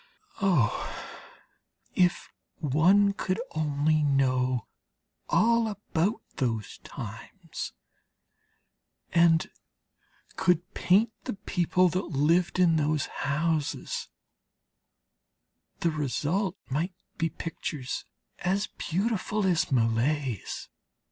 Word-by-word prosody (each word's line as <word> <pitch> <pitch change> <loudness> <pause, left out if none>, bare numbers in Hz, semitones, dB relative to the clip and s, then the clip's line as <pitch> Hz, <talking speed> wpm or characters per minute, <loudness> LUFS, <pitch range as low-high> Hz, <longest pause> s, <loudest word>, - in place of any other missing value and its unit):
Oh, 175 - +2 1.0
if 175 -1 +2 0.2
one 180 +8 +4
could 185 0 -2
only 155 0 +1
know 130 -4 +2 0.6
all 230 0 +4
about 205 -1 -1
those 115 -6 -2
times, - - -7 1.4
and 170 -1 +4 0.9
could 180 +1 +1
paint 205 +6 +3
the 255 - -2
people 185 -2 +2
that 180 +3 -1
lived 165 +4 +2
in 170 -3 +4
those 150 -1 +1 0.2
houses, 155 0 -1 1.7
the 170 - +2
result 155 +6 -1
might 165 +7 -2 0.2
be 165 0 +1
pictures 150 -5 -4 0.4
as 195 +3 +1
beautiful 205 +3 -1
as 175 -5 +2
Millet's. 120 +1 0
165 Hz, 80 wpm, -28 LUFS, 145-185 Hz, 1.7 s, one